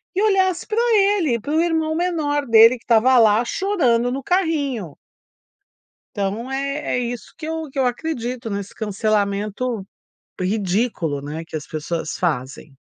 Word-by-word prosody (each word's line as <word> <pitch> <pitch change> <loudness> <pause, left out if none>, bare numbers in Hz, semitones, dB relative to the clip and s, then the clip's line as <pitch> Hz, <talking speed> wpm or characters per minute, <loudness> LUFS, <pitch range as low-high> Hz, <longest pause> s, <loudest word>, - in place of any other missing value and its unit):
e 385 - +1
olhasse 375 -4 +2
pra 430 - -4 0.2
ele, 390 - +2
para 285 +8 -4
o 320 - +3
irmão 320 -2 0
menor 310 -4 0
dele 230 +2 +7
que - - -27
estava 245 +2 +4
lá 220 +1 +4
chorando 245 - +1
no 270 0 -4
carrinho. 285 - -1 1.2
Então, 210 +5 -3
é 275 +2 -2
é 250 - +1
isso 240 -1 -5
que 315 - -7
eu 320 -1 -4
que 275 - -11
eu 260 - +3
acredito, 245 -3 -3
nesse 200 -1 -5
cancelamento 210 +1 -1 0.6
ridículo, 185 - -1
né, 150 +3 -6
que 160 - -7
as 150 - -6
pessoas 155 +1 -4
fazem. 140 -3 -3
240 Hz, 150 wpm, -21 LUFS, 200-310 Hz, 1.2 s, dele